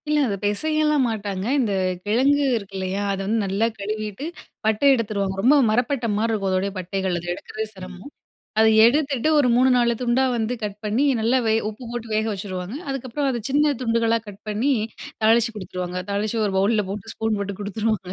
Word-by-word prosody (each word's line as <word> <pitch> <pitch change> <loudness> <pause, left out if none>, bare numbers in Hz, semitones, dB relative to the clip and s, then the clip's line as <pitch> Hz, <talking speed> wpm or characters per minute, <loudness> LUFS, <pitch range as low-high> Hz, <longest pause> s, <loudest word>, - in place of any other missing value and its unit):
இல்ல, 300 0 +3
அத 200 - -1
பெசயலாம் 300 +7 +1
மாட்டாங்க. 200 -4 -3 0.2
இந்த 225 -6 +1 0.3
கிழங்கு 275 +7 +3
இருக்கு 200 -2 -9
இல்லையா! 190 +1 -2
அத 195 - -4
வந்து 225 +3 +1
நல்லா 195 +3 +1
கழுவிட்டு, 215 +4 -4 0.4
பட்ட 220 -1 +1
எடுத்துருவாங்க. 200 -5 -1
ரொம்ப 260 +8 +5
மரப்பட்ட 245 +3 0
மாரி 225 +2 +1
இருக்கும் 200 -3 -1
அதோடய 190 +2 0
பட்டைகள், 185 0 -2
அத 170 - -10
எடுக்குறதே 215 +4 -5
சிரமம். 190 +4 -10 0.5
அத 220 - +6 0.2
எடுத்துட்டு, 275 +1 +1
ஒரு 275 -4 +4
3,4 245 -2 +4
துண்டா 250 +2 +2
வந்து 230 +1 -1
கட் 205 -1 -5
பண்ணி 215 +7 +1 0.2
நல்லா 235 +4 +3
வெ 220 - +3 0.2
உப்பு 220 +4 -11
போட்டு 240 -1 -5
வேக 215 +1 +1
வெச்சிருவாங்க. 190 +2 -5
அதுக்கப்புறம் 270 +1 -2
அதை 240 -2 -2
சின்ன 295 +2 +3
துண்டுகளா 230 -1 +2
கட் 200 -1 -11
பண்ணி, 225 +7 +1 0.5
தாளிச்சு 230 +1 +4
குடுத்துருவாங்க. 180 -2 -4
தாளிச்சு 210 +3 -1
ஒரு 200 - -2
பவுல்ல 210 +2 +2
போட்டு, 200 0 -5
ஸ்பூன் 220 -1 -1
போட்டு 200 -1 -4
குடுத்துருவாங்க. 205 -2 -2
220 Hz, 170 wpm, -23 LUFS, 200-245 Hz, 0.5 s, அத